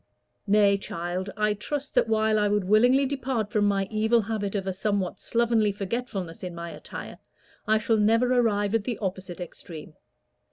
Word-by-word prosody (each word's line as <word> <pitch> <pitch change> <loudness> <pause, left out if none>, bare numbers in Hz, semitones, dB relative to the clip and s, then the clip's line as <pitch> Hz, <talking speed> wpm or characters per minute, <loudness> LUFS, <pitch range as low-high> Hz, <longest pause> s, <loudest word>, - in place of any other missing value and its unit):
"Nay, 200 -1 +4
child, 175 +1 -4
I 210 0 +2
trust 275 +7 -4
that - - +3
while 220 -1 +2
I 210 - +2
would 205 -1 +1
willingly 245 +8 +4
depart 260 -6 -2
from 210 -1 +2
my 195 -1 +1
evil 220 +2 +3
habit 210 -1 -3
of 195 -2 -2
a 190 - -2
somewhat 195 -1 -1
slovenly 230 -3 +2
forgetfulness 195 -4 -4
in 180 -2 -6
my 170 0 -6
attire, - - -9 0.5
I 220 0 +4
shall 225 +1 +1
never 230 +4 +3
arrive 205 -3 +1
at 225 -2 +1
the 245 -3 -2
opposite 190 -3 -4
extreme. 165 -3 -9
210 Hz, 170 wpm, -26 LUFS, 195-225 Hz, 0.5 s, Nay